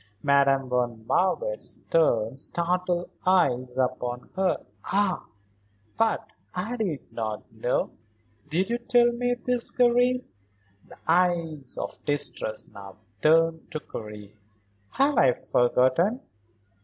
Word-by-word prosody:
Madame 140 -1 +3
von 120 -3 -1
Marwitz - - 0
turned 125 -6 +2
startled 175 +2 0 0.2
eyes 130 -9 +2
upon 125 -1 -2
her. 190 -1 0 0.2
"Ah 195 -1 0 0.7
but 225 -1 0 0.2
I 210 +7 -2
did 195 - -4
not 110 -2 -3
know. 110 +3 -1 0.6
Did 185 +7 0
you 240 - 0
tell 240 0 +4
me 245 +1 0
this, 245 0 +2
Karen?" 250 +1 +2 0.6
the - - -14
eyes 165 -5 +1
of - - -6
distress 145 -6 -1
now 100 -2 -11 0.3
turned 165 +1 +3
to 155 - -4
Karen. 105 -6 -9 0.6
"Have 275 -1 +2
I 125 - +5
forgotten? 130 - +2
165 Hz, 110 wpm, -26 LUFS, -, 0.7 s, I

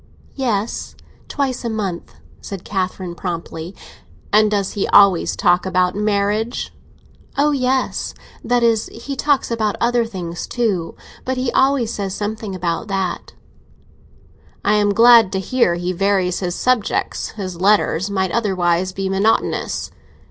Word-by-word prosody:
"Yes; 230 -5 -2 0.3
twice 270 -4 -2
a 235 - -2
month," 200 -6 -4 0.3
said 195 -3 -7
Catherine 185 -2 -3
promptly. 170 0 -5 0.6
"And 215 0 +5
does 200 -2 0
he 200 - -2
always 200 -4 +5
talk 175 -4 +3
about 185 -1 +1
marriage?" 210 +2 -1 0.6
"Oh 295 +1 +3
yes! 260 -1 -1 0.3
That 245 +1 +1
is, 225 -2 +2
he 270 +5 -7
talks 285 -2 +1
about 215 -3 0
other 240 0 +2
things 175 -5 -6
too, 205 -9 -1 0.3
but 260 0 -2
he 255 -1 -1
always 265 -4 +2
says 195 -2 -3
something 210 -1 -4
about 175 +3 -2
that." 195 -3 -3 1.3
"I 210 - +4
am 205 -1 +3
glad 230 -1 +6
to 190 - 0
hear 195 -3 +1
he 175 +1 -2
varies 190 -1 +1
his 180 -2 -2
subjects; 255 -4 0
his 185 -4 -5
letters 200 -2 +2
might 190 -2 -1
otherwise 185 -4 0
be 195 0 -3
monotonous." 195 +4 0
205 Hz, 135 wpm, -19 LUFS, 185-230 Hz, 1.3 s, glad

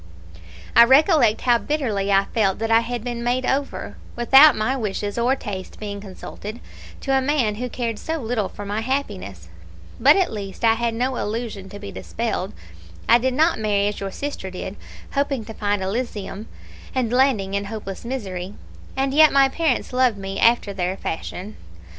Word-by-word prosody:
"I 235 - +10
recollect 265 - +5
how 240 -2 +3
bitterly 215 -6 -1
I 195 0 +4
felt 195 -4 +2
that 225 +1 -2
I 225 - +7
had 235 0 -4
been 240 -1 -4
made 250 +2 0
over, 275 +2 -2 0.2
without 270 +4 +7
my 235 +5 0
wishes 205 -4 -3
or 240 +3 +2
tastes 195 -7 -7
being 205 -1 -6
consulted, 205 +3 -8 0.4
to 270 -1 +1
a 265 - +3
man 260 -6 +1
who 250 - -2
cared 230 -3 -3
so 320 0 -3
little 230 -7 -2
for 205 - -8
my 205 +2 -2
happiness; 205 - -4 0.5
but 280 +5 +7
at 375 -9 +1
least 200 0 -7
I 225 - +6
had 230 0 -1
no 255 +2 -1
illusion 210 -3 -4
to 205 - -9
be 205 0 -8
dispelled; 220 -4 -3 0.6
I 235 - +6
did 255 +1 0
not 320 +1 +3
marry 205 -2 +1
as 210 - -6
your 195 - -3
sister 280 -3 -5
did, 185 +1 -6 0.4
hoping 275 -5 -1
to 220 - -8
find 205 -2 -1
Elysium, 210 0 -4 0.5
and 245 -3 0
landing 250 -7 +2
in 200 0 -1
hopeless 200 -2 -6
misery; 200 -7 -5 0.4
and 270 0 0
yet 310 +1 +7
my 275 -1 +5
parents 290 -4 -1
loved 250 -4 +3
me 195 0 -5
after 230 -3 +3
their 185 0 -2
fashion. 185 +5 -5
225 Hz, 175 wpm, -22 LUFS, 200-260 Hz, 0.6 s, I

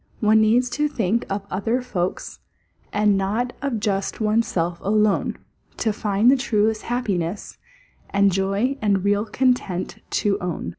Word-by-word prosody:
One 220 0 +4
needs 235 +4 +3
to 300 +4 +1
think 230 -5 -1
of 195 0 -3
other 225 +6 0
folks, 185 -7 -3 0.5
And 210 -1 +3
not 220 +6 -1
of 275 -6 -1
just 195 -2 -2
one's 220 +1 +2
self 170 0 -2
alone, 210 0 +1 0.4
To 220 -2 0
find 210 +3 +2
the - - +5
truest 220 -3 +1
happiness, 205 -7 -3 0.5
And 200 0 +3
joy 195 +9 0
and 200 -3 +1
real 205 +1 +2
content 225 -7 0
to 205 -1 0
own. 175 - -4
210 Hz, 145 wpm, -22 LUFS, 195-235 Hz, 0.5 s, the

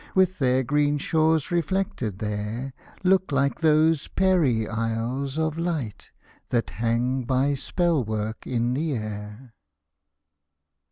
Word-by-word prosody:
With 185 -1 +3
their 130 -1 +2
green 145 +3 +2
shores 160 +2 +1
reflected 170 - -1
there, 105 +5 -4 0.3
Look 190 -2 +3
like 140 0 +1
those 155 -1 +3
Peri 160 - +2
isles 115 +5 -2
of 160 0 -1
light. 160 - -3 0.4
That 115 -9 0
hang 120 +7 0
by 135 +3 +2
spell 165 +1 0
work 110 0 -4
in 120 0 0
the 150 +3 -1
air. 110 +2 -7
135 Hz, 115 wpm, -25 LUFS, 115-160 Hz, 0.4 s, With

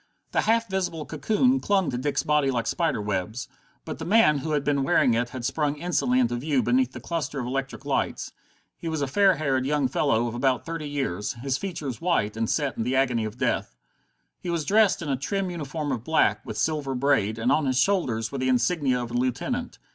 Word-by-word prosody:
The - - +2
half 230 +1 +2
visible 185 -5 -2
cocoon 225 - +1
clung 195 -7 +1
to 120 - -2
Dick's 140 0 0
body 150 -2 +2
like 120 -3 -1
spider 165 -8 0
webs. 105 +3 -3 0.4
But - - -6
the - - -5
man 190 -8 +4
who 155 +3 -3
had 145 -2 +1
been 140 -1 +1
wearing 130 -2 +3
it 120 +1 0
had 125 -2 -6
sprung 150 0 0
instantly 145 -6 +1
into 120 -1 +1
view 135 0 0
beneath 125 +1 +2
the 120 - -7
cluster 150 +1 -3
of 125 - -3
electric 135 +2 -4
lights. - - -1 0.4
He 165 - -5
was 160 -3 -1
a - - +2
fair 190 +6 +4
haired 135 -4 0
young 145 -2 +2
fellow 115 -2 +1
of 115 - -3
about 125 -1 0
thirty 165 -3 -4
years, 105 -9 -2
his 130 +2 -2
features 155 - -5
white 165 -12 +1
and 115 0 -1
set 145 -3 0
in 115 - -1
the 125 +3 -1
agony 125 -4 +2
of 110 +2 -6
death. - - -1 0.6
He 180 - -6
was 170 -3 -1
dressed 205 -1 +3
in 150 - -4
a 135 - +2
trim 190 +8 -2
uniform 150 -2 -4
of 120 -4 -3
black, 160 +4 +2
with - - -6
silver 150 -4 -1
braid, 125 -5 +1
and 115 +3 +1
on 150 0 +2
his 130 -1 +1
shoulders 130 - +1
were 140 - -4
the 130 0 0
insignia 130 0 +1
of 120 - -7
a - - -7
lieutenant. 130 - -2
140 Hz, 220 wpm, -25 LUFS, 125-160 Hz, 0.6 s, man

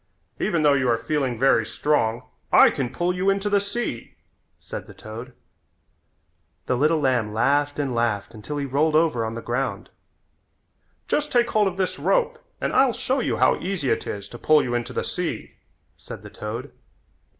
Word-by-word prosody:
"Even 170 -6 +1
though 145 -1 +5
you 130 -3 +2
are 115 - +3
feeling 130 0 -1
very 135 +3 +4
strong 120 -5 0 0.3
I - - +7
can 125 -2 -3
pull 175 +5 0
you 185 +2 +1
into 200 +1 0
the 200 - +4
sea," 200 - -4 0.4
said - - -7
the - - -13
toad. 115 +4 -9 1.3
The 125 - +1
little 155 +5 +2
lamb 120 -7 +1
laughed 145 +5 +2
and 140 -3 -1
laughed 115 -4 -1
until 115 +7 -6
he 140 - -2
rolled 150 +4 +1
over 155 -8 +3
on 110 0 -3
the 115 - -6
ground. 125 +3 -3 1.2
"Just 300 0 0
take 240 -1 +2
hold 210 -2 +3
of 190 -1 -3
this 185 -1 -1
rope 485 -1 +1 0.2
and - - -2
I'll 260 -2 +4
show 260 +4 -1
you - - -1
how - - +3
easy 180 -7 -1
it - - -1
is 100 -1 -5
to 120 - -10
pull 155 -1 +4
you 120 - -3
into 120 -1 -2
the - - -2
sea," - - -3 0.4
said - - -10
the - - -10
toad. 115 +6 -6
145 Hz, 185 wpm, -24 LUFS, 120-185 Hz, 1.3 s, I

